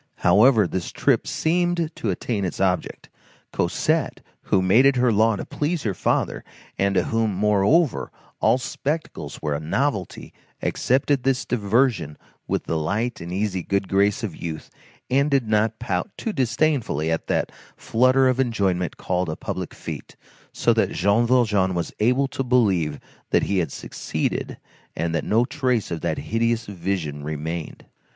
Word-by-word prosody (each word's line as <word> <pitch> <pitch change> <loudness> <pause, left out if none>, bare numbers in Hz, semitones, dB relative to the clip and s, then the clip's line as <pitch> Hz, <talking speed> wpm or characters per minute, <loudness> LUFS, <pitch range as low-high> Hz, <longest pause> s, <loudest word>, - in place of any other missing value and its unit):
However, 105 +4 +6
this 90 -1 -4
trip - - +1
seemed 170 0 0
to 110 - -3
attain 100 +3 -2
its 90 - -3
object. 95 -2 -1 0.5
Cosette, - - 0 0.2
who - - +3
made 115 +9 +5
it 140 - +3
her 125 -1 +3
law 110 +1 +3
to - - -5
please 155 +1 -2
her 105 - 0
father, - - -1 0.3
and 100 0 +1
to - - +3
whom, 115 -3 0
moreover, 105 - +2 0.3
all - - +4
spectacles 130 - -4
were 75 -1 0
a 70 - -2
novelty, 100 - -2 0.3
accepted 135 +2 +1
this 135 0 0
diversion 110 - +1 0.3
with - - -1
the 80 - -1
light 110 +10 -2
and 85 +1 -6
easy 95 0 -1
good 100 +2 -1
grace 100 +2 +2
of 100 -8 -3
youth, 80 -2 -6 0.4
and 140 +3 +3
did 135 -5 +1
not 110 +1 +1
pout 95 -7 -2
too 225 - -3
disdainfully 125 - 0
at 80 - -2
that - - 0 0.3
flutter 130 +3 +3
of 130 0 +1
enjoyment 100 -8 0
called 90 -1 -1
a 80 - -3
public - - -4
fête; - - -8 0.4
so - - +2
that - - +1
Jean 100 +5 +2
Valjean 105 -7 +2
was 85 - -3
able 125 +5 +3
to 135 - -3
believe 95 - +2 0.3
that - - +3
he 100 -1 +1
had 80 -6 -1
succeeded, - - -3 0.4
and 85 0 -2
that 80 - 0
no 115 +3 +2
trace 125 - -1
of 80 -2 -3
that - - -1
hideous 115 +1 0
vision 85 -7 -3
remained. 80 +2 -5
105 Hz, 160 wpm, -23 LUFS, 90-125 Hz, 0.5 s, However